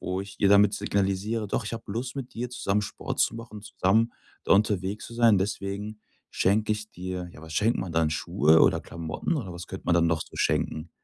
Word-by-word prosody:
wo 90 +1 -2
ich 100 0 -9
ihr 100 - +5
damit 100 0 +6
signalisiere: 100 +3 -1
„Doch, 110 - -1
ich 105 - -5
habe 115 - -8
Lust, 125 +5 -4
mit 130 -2 -6
dir 120 +2 -3
zusammen 105 -4 0
Sport - - -4
zu - - +2
machen, 115 -2 -8
zusammen 105 +4 +1 0.3
da - - +3
unterwegs 100 0 +1
zu 115 - -10
sein. 115 -4 +5
Deswegen 100 +2 -3 0.3
schenke 105 +3 +2
ich 105 0 -5
dir“. 90 0 -5
Ja, 75 - -13
was 80 0 -9
schenkt 115 +7 +2
man 90 - -3
dann, 80 -1 +2
Schuhe 80 +1 +3
oder - - +4
Klamotten, 85 - -4
oder 115 - -4
was 85 +1 -8
könnte 95 - -8
man 85 - +3
dann 85 -1 +4
noch 80 -1 +1
so - - -15
schenken? 80 +2 0
100 Hz, 220 wpm, -27 LUFS, 90-110 Hz, 0.3 s, damit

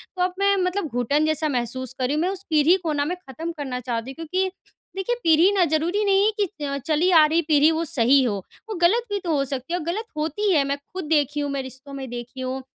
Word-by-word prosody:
तो 360 - -3
अब 365 0 0
मैं 400 0 +3
मतलब 365 -2 -1
घुटन 280 +5 0
जैसा 310 0 +1
महसूस 255 0 -2
कर 255 - +1
रही 275 - 0
हूँ। 310 - 0
मैं 360 - +1
उस 390 0 -6
पीढ़ी 310 +3 +5
को 315 -2 -1
ना 285 0 0
मैं 355 +4 -2
ख़त्म 325 +6 -5
करना 260 -3 -4
चाहती 240 +1 -4
हूँ - - -12
क्योंकि 375 +4 0 0.5
देखिए 435 +6 -1
पीढ़ी 330 +4 +5
ना 370 - +4
ज़रूरी 345 +7 +1
नहीं 395 +1 +4
है 435 - +3
कि 390 -7 -2
अ, 280 0 -2
चली 310 +6 +1
आ 315 -3 +7
रही 325 +2 +2
पीढ़ी 305 +1 +5
वो 325 +1 -1
सही 265 0 +3
हो 215 -5 0 0.3
वो 425 - -3
गलत 445 +8 +4
भी 405 - 0
तो 335 - -1
हो 275 - +1
सकती 270 +5 -5
है। 355 - 0
और 310 - -7
गलत 415 +7 -2
होती 325 +7 0
है 290 -3 +4
मैं 280 0 -1 0.2
खुद 370 -2 -4
देखी 295 -2 +1
हूँ, 285 -1 -2
मैं 275 -1 -2
रिश्तों 265 +2 -10
में 265 -2 -6
देखी 245 +2 -7
हूँ 260 +1 -3
310 Hz, 265 wpm, -23 LUFS, 270-360 Hz, 0.5 s, आ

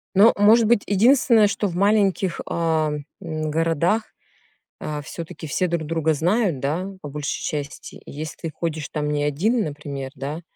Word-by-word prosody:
Ну, 205 +4 +7
может 220 +3 +5
быть, 220 -2 +3
единственное, 230 +1 +5
что 205 0 -1
в 170 - -6
маленьких, 195 -2 +2
а, 160 -2 0 0.3
м, 155 -3 -3
городах, 165 +7 0 0.7
а, 150 -1 -4
всё-таки 160 +1 -8
все 180 +5 0
друг 170 -3 -2
друга 160 -1 +1
знают, 175 - +1
да, 160 +8 -2
по 145 - -7
большей 150 +1 -4
части. 145 -1 -5
И - - -10
если 155 +2 -6
ты 165 - -5
ходишь 155 -2 -4
там 150 -1 -2
не 145 0 0
1, 205 - +1
например, 140 -4 -6
да, 145 +5 -5
165 Hz, 165 wpm, -23 LUFS, 150-200 Hz, 0.7 s, Ну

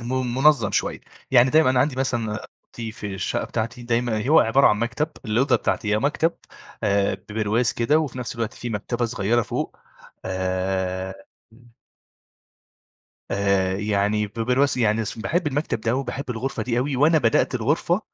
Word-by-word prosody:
م 125 0 -2
منظَّم 135 -5 +4
شوية - - -1 0.3
يعني 125 0 +5
دايمًا 155 -3 +5
أنا 125 -1 +3
عندي 135 -1 +1
مثلاً 115 -5 -1 0.3
أوضتي 115 -2 -6
في 105 -3 -6
الشقة 95 - -2
بتاعتي، 115 +3 -4
دايمًا 120 0 -1
هو 160 - +7
عبارة 135 +5 +4
عن 105 - +3
مكتب، 125 +7 -1 0.2
الأوضة 120 +5 +2
بتاعتي 105 -1 -1
آآ، - - +2
مكتب 150 +6 +1 0.5
آآ، 100 -2 +2
ببرواز 105 +4 -1
كده 145 +7 +2
وفي 140 -5 -3
نفس 125 -2 -4
الوقت 115 -1 -3
في 120 - -6
مكتبة 120 +3 -2
صغيرة 115 0 +1
فوق - - -4 0.5
آآ 95 0 -2 2.2
آآ 100 -1 +1
يعني 105 +1 0
ببرواز 125 +6 +1
يعني 110 -1 +2
باحب 165 +9 -1
المكتب 145 -5 -1
ده 115 +2 0
وباحب 135 0 -4
الغرفة 125 +3 -3
دي 120 -1 -1
أوي، 135 +2 -1
وأنا 155 +5 +4
بدأت 120 0 +2
الغرفة 150 - +1
115 Hz, 150 wpm, -23 LUFS, 105-130 Hz, 2.2 s, هو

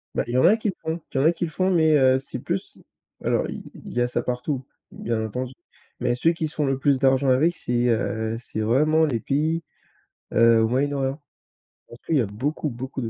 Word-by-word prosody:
Bah - - +1
il 120 - -4
y - - +2
en - - +4
a 210 +6 +6
qui 220 - -1
le 190 - -2
font 160 +1 -3
il - - -1
y - - +3
en 135 - +2
a 165 - +6
qui 170 +1 -3
le 160 - -7
font. 185 +4 0
Mais, 160 -3 +4
heu, 130 -1 +5
c'est 135 - -7
plus - - -4 0.4
alors - - 0
i - - -6
il - - -11
y 120 - 0
a 120 - +2
ça - - -1
partout, 125 +2 -3 0.3
bien 110 -1 -2
entendu. 125 +4 -4 0.5
Mais 120 -1 0
ceux 165 +7 +3
qui 160 -1 -2
se 155 - -11
font 150 - 0
le 135 -1 0
plus 140 -1 +2
d'argent 135 0 +3
avec, 155 +7 +3
c'est, 120 -5 0
heu, 115 -1 -1
c'est 110 -2 -5
vraiment 155 +8 +3
les 125 -6 -1
pays, 155 +6 0 0.7
heu, 115 -1 +5
au 110 - +3
Moyen-Orient. 135 +2 -1 0.7
Parce 120 - -13
que - - -2
il 150 - +4
y - - +4
a - - 0
beaucoup, 140 +9 -3
beaucoup 130 +2 -6
de 115 - -3
135 Hz, 250 wpm, -24 LUFS, 120-155 Hz, 0.7 s, a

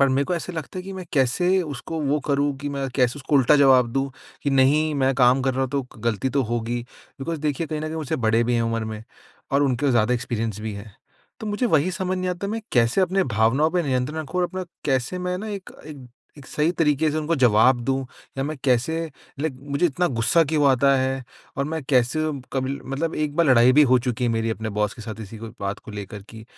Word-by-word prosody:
पर 140 - +5
मेरे 135 +1 +2
को 180 - 0
ऐसा 175 +1 -4
लगता 160 +2 -6
है - - -4
कि 195 - -7
मैं 185 -1 -6
कैसे 175 +9 +2
उसको 155 +1 -5
वो 145 0 +1
करूँ 140 0 +1
कि 145 +1 -4
मैं 135 -1 -2
कैसे 125 0 +2
उसको 145 +1 -2
उल्टा 135 +2 +5
जवाब 130 -3 +5
दूँ 135 0 -1 0.3
कि, 140 - 0
नहीं, 145 +3 +3
मैं 135 -1 +2
काम 125 0 +4
कर 130 -1 0
रहा 130 - -1
हूँ, 130 - -2
तो 140 -1 0
ग - - -14
गलती 115 +3 0
तो 135 - +4
होगी। 120 +1 -1 0.4
बिकॉज़ 160 +3 -3
देखिए, 150 +2 -1
कहीं 155 0 -4
न - - -4
कहीं 160 - -5
मुझसे 155 -4 -2
बड़े 115 +1 +3
भी 120 +1 0
हैं 115 - +2
उम्र 115 -1 -1
में 110 0 -6 0.5
और 140 +1 +4
उनके 135 0 +1
पास - - +3
ज़्यादा 120 +1 +3
एक्सपीरियंस 115 -3 -3
भी 110 0 -4
है। 100 +2 -9 0.5
तो 220 - -5
मुझे 210 +4 0
वही 160 -4 +2
समझ 185 +1 -2
नहीं 185 0 -2
आता, 180 +2 -4
मैं 225 +2 -3
कैसे 120 +8 +3
अपने 190 +1 +2
भावनाओं 130 +8 +3
पर 180 0 +1
नियंत्रण 135 +3 -1
रखूँ 170 +4 -3
और 180 - +2
अपना 185 -1 -5 0.2
कैसे 135 +5 0
मैं 180 0 -2
ना 215 +3 -6
एक 200 -3 -6 0.2
एक 140 -5 -10 0.3
एक 135 - -13
सही 155 +2 0
तरीक़े 155 -2 +2
से 150 - -2
उनको 155 +2 0
जवाब 120 0 +4
दूँ? 135 0 -1 0.3
या 135 - 0
मैं 155 +1 -3
कैसे 125 +3 +2 0.5
लाइक 145 -4 -2
मुझे 140 +5 +2
इतना 175 +3 0
गुस्सा 165 +9 +4
क्यों 150 -1 +2
आता 135 +1 +4
है? 130 0 -1 0.3
और 140 - 0
मैं 160 +1 -3
कैसे 130 +3 +3 0.3
कब 130 -1 -1
ल 140 +1 -3
मतलब 160 +4 -2
एक 150 -1 -2
बार 170 - +4
लड़ाई 125 -2 +6
भी 150 +3 +6
हो 130 - +6
चुकी 125 0 -2
है 120 - +2
मेरी 115 0 0
अपने 110 0 -4
बॉस 105 -1 0
के 115 - -10
साथ, 110 0 -7
इसी 110 +1 -9
को 115 +1 -7
बात 100 0 -3
को - - -11
लेकर 105 0 -7
कि 110 -1 -11
135 Hz, 250 wpm, -23 LUFS, 120-155 Hz, 0.5 s, लड़ाई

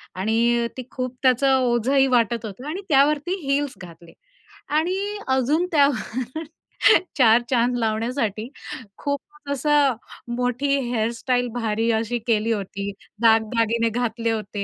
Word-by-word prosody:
आणि 235 +4 +1
ती 255 - -4
खूप 255 -1 -4
त्याचं 265 +1 +4
ओझंही 255 +2 +2
वाटत 235 -2 +1
होतं 230 +7 -8
आणि 360 +6 -4
त्यावरती 295 +5 +3
हील्स 280 0 0
घातले 170 -1 -13 0.6
आणि 385 +5 -1
अजून 265 +6 +2
त्यावर 270 -1 0 0.7
चार 235 -2 +6
चांद 245 -1 +2
लावण्यासाठी 225 -1 -1 0.5
खूप 285 -1 -2 0.3
मो - - -3
असा 295 +2 0 0.6
मोठी 250 +3 -1 0.2
हेअरस्टाईल 245 +2 0
भारी 225 -1 -1
अशी 230 +2 -2
केली 225 0 +1
होती, 200 -1 -3 0.3
दागदागिने 230 0 +3
घातले 230 0 -1
होते 210 -2 -3
240 Hz, 120 wpm, -23 LUFS, 225-270 Hz, 0.7 s, चार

